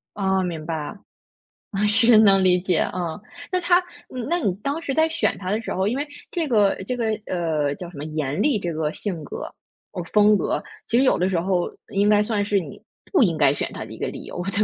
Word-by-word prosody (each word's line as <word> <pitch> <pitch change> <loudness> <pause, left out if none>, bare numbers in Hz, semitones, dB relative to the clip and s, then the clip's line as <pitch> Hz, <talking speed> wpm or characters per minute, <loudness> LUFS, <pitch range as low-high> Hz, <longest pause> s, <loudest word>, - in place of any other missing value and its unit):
嗯， 190 -2 +1
明 160 -3 -5
白。 160 +2 -4 0.8
嗯， 205 +1 +1
是， 225 +2 +5
能 195 -3 +6
理 180 -1 +4
解， 180 -1 +1
嗯， 170 -2 -3 0.3
那 365 - +2
他 350 0 +4 0.3
嗯， 250 -3 -5
那 345 - +2
你 205 - +1
当 285 +4 -2
时 280 -5 -3
在 315 0 +4
选 330 +1 0
他 185 -1 -5
的 215 +3 0
时 - - -5
候 190 +2 0
因 245 +6 0
为 290 +1 -3 0.2
这 330 -4 -2
个 210 -5 +4
这 250 - -2
个 225 -2 0 0.2
呃， 155 -5 0
叫 175 +1 -8
什 150 - -11
么 145 - -5
严 150 -2 -2
厉 280 -7 +3
这 175 -3 -3
个 155 -1 -1
性 180 -7 -4
格 145 - -7 0.4
哦， 180 - -4
风 210 0 +6
格， - - -1 0.2
其 235 - +1
实 265 - +5
有 - - +3
的 180 +1 +2
时 180 -3 0
候 180 0 0 0.2
应 200 +1 +2
该 210 -1 +5
算 210 -1 0
是 205 0 +1
你 180 - -7 0.3
不 360 - +5
应 170 -8 +3
该 140 -2 +4
选 - - -3
他 - - -5
的 - - -11
一 - - -10
个 - - -2
理 - - -7
由， 175 - -5
对 205 - +1
195 Hz, 260 characters per minute, -23 LUFS, 175-230 Hz, 0.8 s, 能